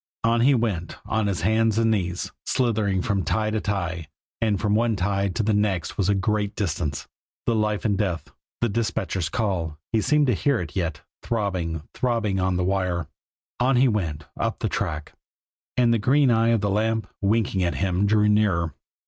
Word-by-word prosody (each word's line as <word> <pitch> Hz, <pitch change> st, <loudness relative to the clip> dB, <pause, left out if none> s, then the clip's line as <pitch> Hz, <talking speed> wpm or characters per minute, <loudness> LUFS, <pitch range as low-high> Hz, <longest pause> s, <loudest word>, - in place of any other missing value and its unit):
On 115 Hz, +1 st, +3 dB
he 135 Hz, +3 st, +5 dB
went, 100 Hz, -8 st, -2 dB
on 110 Hz, -1 st, 0 dB
his 95 Hz, -4 st, -1 dB
hands 110 Hz, 0 st, +2 dB
and 115 Hz, 0 st, +3 dB
knees, 90 Hz, -4 st, -1 dB
slithering 105 Hz, -7 st, +1 dB
from 100 Hz, -3 st, 0 dB
tie 110 Hz, +3 st, 0 dB
to 110 Hz, -1 st, -1 dB
tie 90 Hz, -6 st, -2 dB, 0.3 s
and 105 Hz, -4 st, +1 dB
from 105 Hz, 0 st, +1 dB
one 115 Hz, +1 st, +2 dB
tie 100 Hz, +1 st, 0 dB
to 95 Hz, +3 st, -1 dB
the 110 Hz, +1 st, +2 dB
next 100 Hz, -4 st, 0 dB
was 100 Hz, -1 st, 0 dB
a 100 Hz, -, +3 dB
great 105 Hz, 0 st, 0 dB
distance. 80 Hz, -7 st, -2 dB, 0.4 s
The 115 Hz, -, +2 dB
life 105 Hz, -1 st, 0 dB
and 100 Hz, -2 st, +1 dB
death, 90 Hz, -7 st, -1 dB, 0.3 s
the 120 Hz, -, +2 dB
dispatcher's 100 Hz, -5 st, -1 dB
call 85 Hz, -7 st, -1 dB, 0.2 s
he 110 Hz, -, +3 dB
seemed 150 Hz, +5 st, +3 dB
to 125 Hz, -, +2 dB
hear 140 Hz, +5 st, +1 dB
it 80 Hz, -5 st, -6 dB
yet 85 Hz, -6 st, -2 dB, 0.2 s
throbbing, 90 Hz, -8 st, -2 dB
throbbing 115 Hz, -6 st, 0 dB
on 95 Hz, 0 st, +1 dB
the 90 Hz, -, 0 dB
wire. 90 Hz, -4 st, -1 dB, 0.5 s
On 130 Hz, +2 st, +3 dB
he 130 Hz, +2 st, +5 dB
went, 85 Hz, -10 st, -1 dB
up -, -, -1 dB
the -, -, -2 dB
track; 75 Hz, 0 st, -3 dB, 0.6 s
and 120 Hz, -2 st, +4 dB
the 115 Hz, -, +2 dB
green 135 Hz, +4 st, +4 dB
eye 115 Hz, 0 st, +3 dB
of 115 Hz, -3 st, +2 dB
the 100 Hz, 0 st, 0 dB
lamp, 110 Hz, +2 st, +1 dB, 0.2 s
winking 100 Hz, -1 st, +1 dB
at 85 Hz, -, 0 dB
him, 95 Hz, +1 st, +1 dB
drew 105 Hz, 0 st, +4 dB
nearer. 100 Hz, -7 st, +2 dB
105 Hz, 190 wpm, -24 LUFS, 90-110 Hz, 0.6 s, he